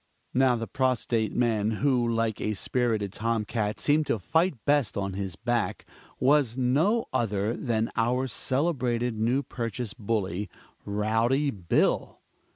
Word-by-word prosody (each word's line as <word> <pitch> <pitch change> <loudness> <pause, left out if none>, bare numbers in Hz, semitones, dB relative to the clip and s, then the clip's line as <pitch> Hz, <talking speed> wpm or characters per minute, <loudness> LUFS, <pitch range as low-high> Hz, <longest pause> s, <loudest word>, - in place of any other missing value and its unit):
Now 130 -1 +4
the 115 -1 -3
prostrate 120 -5 0
man, 110 -3 +1
who 125 -4 +3
like 115 -2 -1
a 105 0 -1
spirited 110 -2 -1
tom 115 0 -1
cat 105 -2 -2
seemed 150 0 +2
to - - +1
fight 160 - +1
best 145 -8 +2
on 100 -1 -2
his 95 -3 -4
back, 115 -4 -1 0.3
was 135 -3 +3
no 155 - +2
other 110 -2 0
than 115 -2 -1
our 125 +3 +1
celebrated 125 -3 0
New 125 +5 +1
Purchase 115 -3 -4
bully 105 -4 -2 0.4
Rowdy 115 +7 +1
Bill! 90 -7 0
115 Hz, 135 wpm, -27 LUFS, 105-130 Hz, 0.4 s, Now